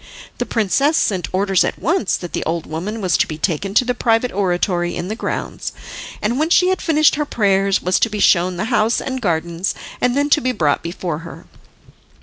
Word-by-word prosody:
The - - -2
princess 275 - +1
sent 185 -4 0
orders 195 0 +2
at - - -2
once 310 - 0
that 175 - -8
the - - -2
old 165 0 -2
woman 195 +8 -5
was 180 -4 +1
to - - +2
be 155 - -6
taken 190 +4 -2
to 250 - +4
the 250 - 0
private 235 0 +1
oratory 180 -2 0
in 180 - -4
the 215 - -2
grounds, - - -4 0.5
and 235 +5 0
when 310 +2 +1
she 360 +1 +4
had 375 - 0
finished 310 -2 +3
her 300 - +1
prayers 195 -5 +1
was 185 0 +2
to 230 - +2
be 210 -1 -4
shown 180 -2 +3
the 185 - -2
house 225 +1 +2
and 260 -1 -4
gardens, 170 -1 -1 0.3
and 250 +1 +1
then 290 +1 +1
to 300 - +5
be 255 -1 0
brought 150 -9 +1
before 170 -2 -4
her. 165 0 -11
200 Hz, 210 wpm, -19 LUFS, 175-250 Hz, 0.5 s, to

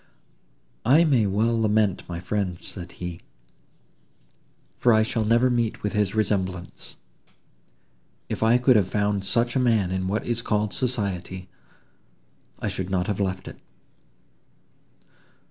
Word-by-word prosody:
"I 145 +8 +5
may 130 -10 +3
well 110 +4 +1
lament 105 -4 +1
my 85 -1 -4
friend," 90 0 -2
said 90 -2 -8
he, 90 -1 -6 1.6
"for 120 - +3
I 110 0 +5
shall 115 -1 -1
never 120 +3 +4
meet 120 -2 -1
with 105 - -1
his 105 -1 0
resemblance. 95 -4 -2 1.3
If - - -4
I 115 +2 +5
could 125 -1 +4
have 100 -4 +2
found 100 -1 0
such 115 +5 +1
a - - +3
man 110 -7 +2
in 95 0 -1
what 105 +3 -1
is 120 -1 0
called 105 -2 -1
society, 95 -7 -2 1.1
I - - -4
should 95 -2 -3
not 90 -2 0
have 105 0 -2
left 95 -1 -2
it." - - -10
105 Hz, 135 wpm, -25 LUFS, 95-115 Hz, 1.6 s, I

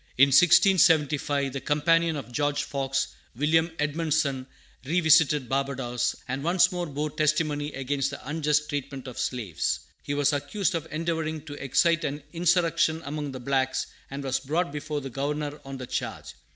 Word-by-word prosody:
In 140 +2 +7
1675, 150 -4 +4
the 135 - -4
companion 165 +2 +2
of 130 -5 -7
George 145 +2 0
Fox, 135 -1 -1 0.3
William 160 +5 +2
Edmundson, 150 -3 0 0.4
revisited 155 -2 +4
Barbadoes, 130 -2 -1
and 135 +2 -3
once 175 +2 +4
more 175 -1 -3
bore 150 +1 -3
testimony 150 -1 0
against 135 0 -1
the - - -9
unjust 150 0 +1
treatment 140 -2 -5
of 125 - -7
slaves. 100 - -2 0.2
He 145 - -3
was 145 0 +2
accused 190 +7 -1
of 165 -2 -3
endeavoring 160 -1 -2
to 145 - -8
excite 170 +5 +2
an 145 0 -3
insurrection 165 -1 +2
among 145 0 -4
the 130 - -7
blacks, 130 0 0 0.2
and 140 +1 -6
was 130 -1 0
brought 155 +4 -1
before 150 0 -4
the 135 -1 -7
Governor 145 +2 -3
on 135 0 -7
the 130 - -6
charge. - - -5
145 Hz, 155 wpm, -26 LUFS, 135-160 Hz, 0.4 s, In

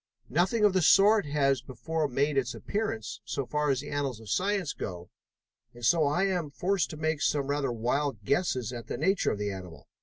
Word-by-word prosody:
Nothing 185 - +2
of 205 - +4
the 185 - +2
sort 200 +3 +5
has 140 -3 +2
before 155 +5 -3
made 140 +3 0
its 125 -3 0
appearance, 205 - -3
so 140 - -3
far 150 +2 -1
as 135 -1 +1
the 145 - -8
annals 140 -5 -2
of 110 -3 -8
science 195 -5 0
go, 90 -1 -7 0.6
and 120 -1 -6
so 160 +2 +4
I 150 +6 +1
am 180 -6 -1
forced 185 +6 0
to 155 - -7
make 155 -1 -1
some 145 -2 +1
rather 140 -2 -1
wild 120 0 -1
guesses 130 - 0
at 120 -2 -7
the - - -4
nature 190 +6 +2
of - - -2
the 105 0 -2
animal. 90 -3 -9
145 Hz, 205 wpm, -29 LUFS, 125-175 Hz, 0.6 s, sort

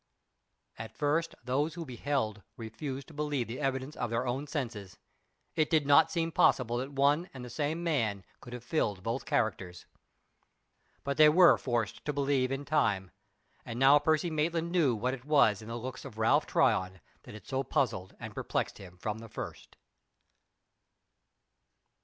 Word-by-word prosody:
At 110 0 -8
first 155 +3 0
those 145 +6 -1
who 170 -2 -5
beheld 120 -5 -2 0.2
refused 130 +5 -6
to - - -13
believe 145 -4 -2
the 115 +3 -6
evidence 135 0 -2
of 120 - -3
their 115 +2 -1
own 130 +4 -2
senses. 115 - -5 0.6
It 155 -1 +1
did 155 -4 +2
not 145 +3 +6
seem 165 -1 -1
possible 120 -5 +3
that 130 +3 -4
one 145 +6 +2
and 125 -1 -7
the 120 - -9
same 155 +5 -2
man 115 - 0 0.2
could 120 - -12
have 125 -1 -7
filled 105 - -1
both 115 +3 -3
characters. 90 -1 -1 1.2
But 140 0 -2
they 155 -1 +8
were 175 +3 +7
forced 120 -5 -2
to 150 - -1
believe 135 -2 +1
in 135 +1 -3
time. 105 -12 +1 0.5
And 115 - -6
now 135 +3 +6
Percy 160 +3 +1
Maitland 165 +2 -1
knew 155 -9 +3
what 125 +4 -1
it 130 -2 -7
was 135 -8 +3
in 110 - -11
the 115 +1 -4
looks 125 +2 -6
of 130 -6 -10
Ralph 110 0 +3
Tryon 95 0 +1 0.2
that - - -12
had 105 - -12
so 135 0 -1
puzzled 120 -10 -1
and - - -7
perplexed - - -3
him 90 -2 -12
from 105 +4 -4
the 115 0 -10
first. - - -8
130 Hz, 170 wpm, -30 LUFS, 115-150 Hz, 1.2 s, they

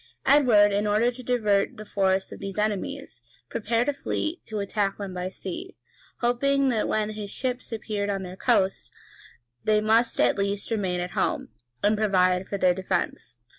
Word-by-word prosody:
Edward, 245 -8 +6
in 205 +1 +1
order 215 +4 +3
to 250 +1 -9
divert 215 -5 +1
the 215 - -8
force 190 -2 0
of - - -9
these 195 0 -6
enemies, 215 +7 -3 0.3
prepared 230 +3 0
a 290 - +2
fleet 310 +4 -3
to 215 - -4
attack 200 0 -1
them 200 -2 -5
by 180 0 -3
sea, 335 - -7 0.4
hoping 275 +3 +2
that 225 -4 0
when 215 0 0
his 210 -1 -6
ships 255 +3 -3
appeared 210 -2 -3
on 195 -1 -2
their 180 0 -7
coast, 190 0 +1 0.7
they 215 0 +3
must 225 +2 +2
at 125 +9 +3
least 200 +2 -2
remain 190 -5 0
at 180 0 -3
home, 215 +6 -1 0.3
and 210 +1 +4
provide 185 -3 +2
for 200 - -3
their 185 -2 +4
defence. 185 -8 -3
210 Hz, 170 wpm, -26 LUFS, 195-235 Hz, 0.7 s, Edward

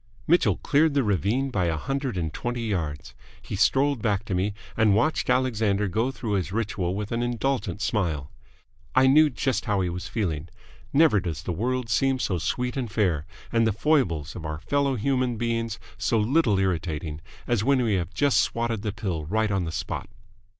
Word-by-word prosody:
Mitchell 175 +3 +3
cleared 150 +1 +2
the 140 - +3
ravine 110 +6 0
by 95 -7 0
a 80 -2 0
hundred 135 - -2
and 80 -3 -2
twenty 120 -1 -3
yards. 80 -9 -3 0.3
He - - -6
strolled 140 -2 +2
back 105 -2 0
to 100 - -3
me, 95 +3 0 0.2
and 110 -3 +4
watched 150 +9 +1
Alexander 110 -5 +2
go 110 +7 0
through 120 -4 -5
his 95 -3 0
ritual 100 -4 -1
with 105 0 -4
an 115 0 0
indulgent 120 -4 -1
smile. 80 -10 -1 0.6
I 130 - +6
knew 150 +3 +6
just 130 0 -1
how 105 -4 +1
he 90 - 0
was 90 +1 -5
feeling. 85 -8 -2 0.4
Never 140 -8 +5
does 85 -3 -4
the 90 - -3
world 125 +6 -1
seem 135 +4 +2
so 95 -8 -1
sweet 125 +9 -2
and 125 -5 -3
fair 90 -8 0 0.2
and 115 -1 +3
the - - +3
foibles 105 - +1
of 85 - -7
our 75 -1 -4
fellow 140 - 0
human 125 0 0
beings 115 -1 -1 0.2
so 115 - +1
little 115 -1 +3
irritating 80 -5 -2 0.2
as 120 -4 +1
when 135 0 +3
we 110 -3 +1
have 90 -3 -1
just 145 -2 +3
swatted 115 -2 -1
the 105 -1 -2
pill 95 -8 -3
right 110 +5 0
on 95 -3 0
the 80 - -4
spot. 80 - -4
110 Hz, 190 wpm, -26 LUFS, 90-130 Hz, 0.6 s, I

